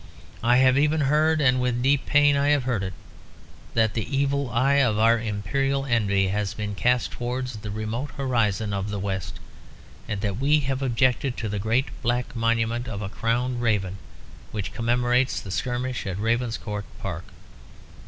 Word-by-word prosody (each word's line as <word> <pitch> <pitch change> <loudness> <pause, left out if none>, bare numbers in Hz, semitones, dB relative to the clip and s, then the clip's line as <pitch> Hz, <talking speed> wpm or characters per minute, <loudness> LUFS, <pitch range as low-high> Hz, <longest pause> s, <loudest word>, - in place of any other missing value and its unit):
I 120 +2 +4
have 130 +1 +5
even 150 +1 +2
heard, 155 +3 +3
and 130 -2 +3
with 125 -1 0
deep 140 +1 +2
pain 145 0 +5
I 140 0 +2
have 145 -2 +3
heard 120 -5 -1
it, 95 -1 -4 0.8
that 110 -2 +3
the 120 +5 -2
evil 140 -1 0
eye 130 +4 +2
of 110 -5 +2
our 115 +1 +4
imperial 125 +6 -1
envy 100 -6 +2
has 100 0 -2
been 105 -1 -4
cast 125 +4 +1
towards 125 0 -4
the 105 0 -7
remote 110 +6 -3
horizon 110 -6 0
of 100 +1 -2
the 105 - -3
west, 95 -1 -4 0.7
and 105 - -3
that 100 -2 -2
we 145 +4 +3
have 135 0 -2
objected 130 0 +1
to 110 - -3
the 105 0 -2
great 115 +6 +1
black 120 +1 -1
monument 115 +1 0
of 105 -1 -4
a 95 - -4
crowned 120 +3 -1
raven, 100 -5 0 0.5
which 105 -3 -5
commemorates 120 +2 +1
the 95 - -8
skirmish 125 +5 -2
of 95 -1 -3
Ravenscourt 115 -2 -1
Park. 90 -3 -5
120 Hz, 170 wpm, -25 LUFS, 105-130 Hz, 0.8 s, have